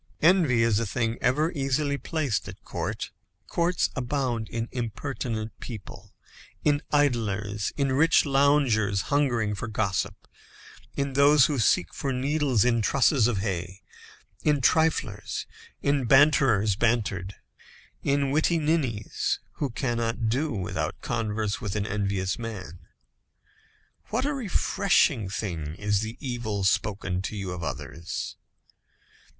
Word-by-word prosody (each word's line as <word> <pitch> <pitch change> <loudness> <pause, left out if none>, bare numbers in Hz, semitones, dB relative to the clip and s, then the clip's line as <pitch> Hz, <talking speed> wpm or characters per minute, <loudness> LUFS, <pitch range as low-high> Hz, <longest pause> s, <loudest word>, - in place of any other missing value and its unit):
Envy 160 -9 +5
is 110 -2 +3
a 115 - -1
thing 115 +2 -1
ever 150 +7 +2
easily 140 -1 0
placed 140 - -2
at - - -10
court. - - -4 0.3
Courts 175 +1 0
abound 125 -4 -1
in 115 0 -3
impertinent 115 -2 -3
people, 105 -3 -9 0.5
in 145 -1 +3
idlers, 110 -7 0
in 140 -2 +1
rich 155 +6 +4
loungers 135 -8 +3
hungering 120 -7 +2
for 110 +3 -4
gossip, 105 -3 -2 0.7
in 140 -1 -1
those 140 0 +6
who 150 -4 0
seek 90 -5 +2
for 135 - -2
needles 135 -3 +1
in 120 -2 +3
trusses 130 +1 +3
of 105 -6 0
hay, 95 -1 -4 0.6
in 150 -1 +3
triflers, 135 -7 +1 0.4
in 140 -3 +1
banterers 130 -7 +5
bantered, 105 -5 0 0.7
in 140 -1 +1
witty 160 +3 +2
ninnies, 150 -10 0 0.2
who 145 - -1
cannot 115 -1 -1
do 140 +7 0
without 95 -6 -3
converse 110 -2 -2
with 105 -3 -3
an 105 -1 -1
envious 100 -1 -1
man. 95 -7 -7 1.2
What 245 +5 -1
a 290 - 0
refreshing 190 - +1
thing 85 -7 -4
is 105 +1 0
the 110 +2 -5
evil 120 -6 -3
spoken 95 -1 0
to 95 - -4
you 100 -3 -4
of 90 -1 -5
others. 85 +1 -5
120 Hz, 125 wpm, -26 LUFS, 105-140 Hz, 1.2 s, those